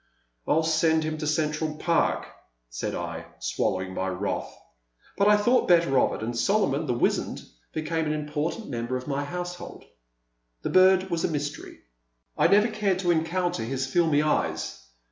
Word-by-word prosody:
" - - -44
I - - +3
*11 160 +1 +2
send 160 0 +2
him 155 0 -3
to 155 - -3
Central 155 0 0
Park," 165 +2 +1 0.5
said - - -3
I, - - -5
swal - - 0
lowing 95 0 -4
my 95 0 -2
wrath; 95 +2 -3 0.6
but 200 - +3
I 210 0 +6
thought 240 +5 +2
better 170 -7 +4
of - - +2
it, - - -6
and 120 +2 -3
Solomon, 160 - +1
the 125 - 0
wizened, - - 0 0.3
became 160 0 -2
an 150 - 0
important 150 +7 -3
member 120 0 -3
of 125 - -8
my 140 0 -1
household. 175 +3 -6 0.8
The - - -2
bird 185 0 +5
was 170 -1 0
a - - +3
mystery. 145 -1 -5 0.5
I - - +4
never 210 +3 +4
cared 210 -4 0
to 175 -2 +2
encounter 175 +2 0
his 130 +3 -2
filmy 150 +1 +2
eyes. 155 - -1
155 Hz, 175 wpm, -26 LUFS, 135-175 Hz, 0.8 s, I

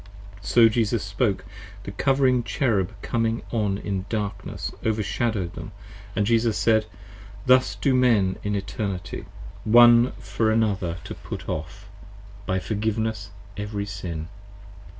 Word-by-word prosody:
So 115 +2 +5
Jesus 110 0 +1
spoke: 100 -2 -1 0.4
the - - -6
Covering 130 +3 +2
Cherub 115 - 0
coming 115 -1 0
on 105 -4 0
in 100 -1 -4
darkness 105 -2 -4
Overshadow'd 110 -3 -1
them - - -8 0.3
& 100 +1 -3
Jesus 115 +1 +2
said. 110 -2 +3 0.6
Thus 130 -6 +4
do 130 +7 +1
Men 115 -7 +3
in 105 0 -2
Eternity, 100 -3 -4 0.4
One 120 +2 +7
for 100 +3 -1
another 100 -6 +1
to - - -6
put - - -8
off, 100 +7 -5 0.6
by 95 - +1
forgiveness, 110 +1 -2 0.3
every 105 0 -3
sin. 90 -6 -5
105 Hz, 120 wpm, -24 LUFS, 100-115 Hz, 0.6 s, One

